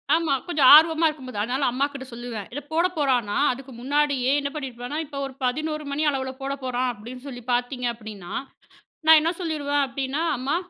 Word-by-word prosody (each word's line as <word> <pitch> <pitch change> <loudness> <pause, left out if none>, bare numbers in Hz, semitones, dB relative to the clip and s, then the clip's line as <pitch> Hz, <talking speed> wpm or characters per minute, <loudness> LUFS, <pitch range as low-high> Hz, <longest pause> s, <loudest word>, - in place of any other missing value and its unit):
ஆமா. 325 -4 +1
கொஞ்சம் 295 -6 +5
ஆர்வமா 320 +1 +6
இருக்கும்போது, 260 -8 -5
அதனால 255 +5 0
அம்மாகிட்ட 275 +1 -2
சொல்லுவேன். 235 -4 -6
இத 290 - -4
போட 335 +2 +3
போறானா 250 -8 +1
அதுக்கு 265 +1 -8
முன்னாடியே 280 -1 +1
என்ன 280 0 -2
பண்ணியிருப்பேன்னா, 260 0 -5
இப்ப 280 -1 -7
ஒரு 270 - -7
11 305 +4 -1
மணி 300 +2 -1
அளவுல 265 -2 -2
போட 275 +1 -2
போறான் 255 0 0
அப்டின்னு 245 +5 -10
சொல்லி 245 -3 -8
பார்த்தீங்க 245 0 -1
அப்டின்னா, 210 -6 -9 0.7
நான் 320 -1 +9
என்ன 330 +2 +1
சொல்லிருவேன் 290 -3 0
அப்டின்னா, 270 +3 -3 0.2
"அம்மா, 270 +5 -1
270 Hz, 170 wpm, -24 LUFS, 250-295 Hz, 0.7 s, நான்